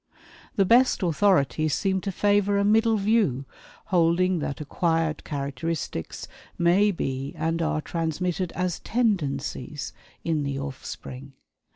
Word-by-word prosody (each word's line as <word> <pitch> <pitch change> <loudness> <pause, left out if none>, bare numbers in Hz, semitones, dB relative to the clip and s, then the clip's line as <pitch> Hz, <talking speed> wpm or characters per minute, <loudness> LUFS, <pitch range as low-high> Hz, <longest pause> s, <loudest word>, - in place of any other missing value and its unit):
The 195 - +3
best 240 +1 +4
authorities 155 -5 +2
seem 190 -2 0
to 195 - -3
favor 205 +1 +2
a 200 - +2
middle 220 +1 +4
view, 200 - +1 0.5
holding 175 +1 +3
that 145 -2 -3
acquired 160 +1 0
characteristics 140 - -4 0.3
may 180 +5 +4
be 135 -7 -3
and 165 +1 -1
are 155 -1 0
transmitted 170 +3 -2
as 180 -2 -2
"tendencies" 160 - -1 0.3
in 160 -2 0
the 140 -1 -2
offspring. 135 0 -7
170 Hz, 115 wpm, -26 LUFS, 145-195 Hz, 0.5 s, best